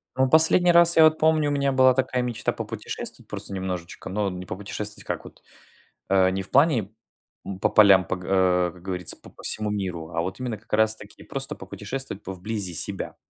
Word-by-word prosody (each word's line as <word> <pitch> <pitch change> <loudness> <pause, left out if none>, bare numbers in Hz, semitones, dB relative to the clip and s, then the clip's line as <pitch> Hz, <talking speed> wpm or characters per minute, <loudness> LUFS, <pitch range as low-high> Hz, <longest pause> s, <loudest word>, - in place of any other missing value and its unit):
Ну, 130 0 +3
в - - -2
последний 160 +3 +5
раз 170 0 +5
я, 160 - +8
вот, 155 0 +5
помню, 155 -2 +3
у - - -1
меня 140 -1 +1
была 130 -1 +5
такая 125 -1 0
мечта 120 -2 -2
попутешествовать - - -7
просто 100 - -4
немножечко, 90 -2 -5
но 100 +1 -1
не 90 0 -7
попутешествовать 105 +2 -6
как - - -4
вот, - - -14 0.7
э, 95 -1 +4
не 95 +1 -2
в - - -15
плане, 140 -4 +4 0.6
м, 95 -1 -6
по - - +2
полям, 100 -3 +6
по - - -2
г 90 - -11
э, 90 -2 +2
как 90 - -16
говорится, 90 -3 -3
по - - -15
п - - -34
всему 105 -1 0
миру, 90 -5 -4
а 85 0 -1
вот 95 +5 -5
именно 120 -4 -4
как 110 +2 -17
раз-таки 110 -1 0
просто 135 -1 -5
попутешествовать 105 +4 -7
по 95 - -6
вблизи 95 -1 -2
себя. 95 +5 0
105 Hz, 210 wpm, -24 LUFS, 95-130 Hz, 0.7 s, я